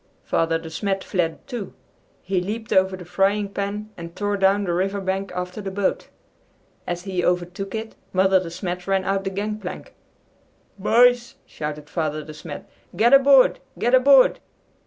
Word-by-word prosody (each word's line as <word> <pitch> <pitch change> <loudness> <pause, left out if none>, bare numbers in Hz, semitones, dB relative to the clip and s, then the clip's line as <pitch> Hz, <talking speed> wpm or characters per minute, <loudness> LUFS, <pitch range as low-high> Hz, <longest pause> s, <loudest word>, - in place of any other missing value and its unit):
Father 165 0 +1
De 165 - -9
Smet 195 +3 -2
fled, 170 -4 -2
too. 235 -7 -6 0.5
He 185 -1 0
leaped 215 +4 -4
over 190 0 +3
the 180 - -10
frying 195 +4 +1
pan 205 +2 -4
and 170 0 -9
tore 205 0 -1
down 195 +1 +3
the 175 -3 -1
river 195 +3 0
bank 195 +1 -2
after 180 +3 -4
the 195 - -4
boat. 195 0 -1 0.8
As 175 0 -3
he 185 -2 -2
overtook 180 +3 -1
it, 220 0 -5 0.2
Mother 190 0 +4
De 180 -2 -6
Smet 180 +1 -5
ran 195 -1 +1
out 195 0 -1
the - - 0
gang 210 +2 -3
plank. 185 -4 -8 0.9
"Boys!" 240 +4 +4
shouted 150 -1 -6
Father 155 -1 -2
De 155 - -10
Smet. 150 -1 -9 0.3
"Get 235 +4 +4
aboard! 275 -1 +6 0.2
Get 240 +2 0
aboard!" 260 0 +6
195 Hz, 165 wpm, -23 LUFS, 180-210 Hz, 0.9 s, aboard